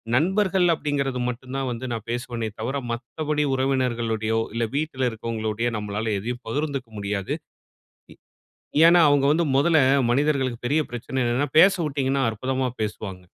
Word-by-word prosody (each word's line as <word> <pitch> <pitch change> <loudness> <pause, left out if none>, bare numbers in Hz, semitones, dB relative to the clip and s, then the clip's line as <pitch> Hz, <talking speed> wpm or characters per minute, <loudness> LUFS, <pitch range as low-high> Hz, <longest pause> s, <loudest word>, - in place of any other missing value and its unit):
நண்பர்கள் 190 +4 +2
அப்படிங்கிறது 140 -4 -1
மட்டும் 125 +1 -7
தான் 135 -1 -2
வந்து 120 +2 -5
நான் 115 -2 -5
பேசுவனே 120 -2 -3
தவிர, 120 +5 -2 0.2
மத்தபடி 150 +6 -2
உறவினர்களோடையோ, 120 -4 0
இல்லை 115 0 0
வீட்டில் 145 -4 -1
இருக்கிறவங்களோடையோ 115 0 -2
நம்பளால 105 +1 -3
எதையும் 120 +4 -5
பகிர்ந்துக்க 140 0 -2
முடியாது. 100 -1 -2 0.8
இ - - -14 0.7
ஏன்னா 175 +1 +6
அவங்க 145 -1 +3
வந்து 165 +3 +2
முதல்ல 160 +3 +4 0.3
மனிதர்களுக்கு 135 -3 +1
பெரிய 145 +5 +2
பிரச்சனை 120 +2 -5
என்னன்னா, 125 +5 +1
பேசவுட்டீங்கன்னா 145 -7 +3
அற்புதமா 130 +4 -2
பேசுவாங்க. 100 -3 -4
130 Hz, 130 wpm, -24 LUFS, 115-145 Hz, 0.8 s, ஏன்னா